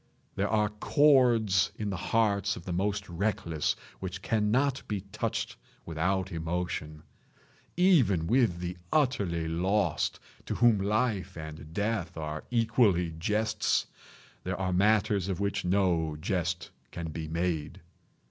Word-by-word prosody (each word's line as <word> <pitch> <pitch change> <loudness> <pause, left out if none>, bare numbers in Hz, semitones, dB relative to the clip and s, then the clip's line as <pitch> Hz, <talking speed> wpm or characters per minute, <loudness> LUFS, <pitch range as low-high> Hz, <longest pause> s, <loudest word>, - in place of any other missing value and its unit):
There 100 +1 -1
are 105 -1 +2
chords 115 - +4
in 105 -2 -2
the - - -2
hearts 100 0 +1
of 85 - -10
the 90 - -3
most 100 +3 -1
reckless 85 -3 -1 0.2
which 95 -1 -6
cannot 120 +5 +1
be 105 -3 -2
touched 110 +3 -3 0.3
without 95 +4 -1
emotion. 80 -2 -3 0.7
Even 135 - +4
with 115 -3 +2
the 90 0 -4
utterly 100 - +1
lost, 90 +2 0 0.3
to - - -2
whom 120 -3 +4
life 100 -2 0
and 80 -1 -8
death 100 -3 -2
are 75 -1 -5
equally 115 -7 +2
jests, 105 +4 +1 0.6
there - - -3
are 95 -1 -1
matters 100 0 +2
of 95 - -2
which 100 -1 -1
no 90 -4 +1
jest 90 +1 -2 0.2
can 80 -2 -6
be 80 +1 -5
made. 80 -2 -2
95 Hz, 130 wpm, -29 LUFS, 85-110 Hz, 0.7 s, chords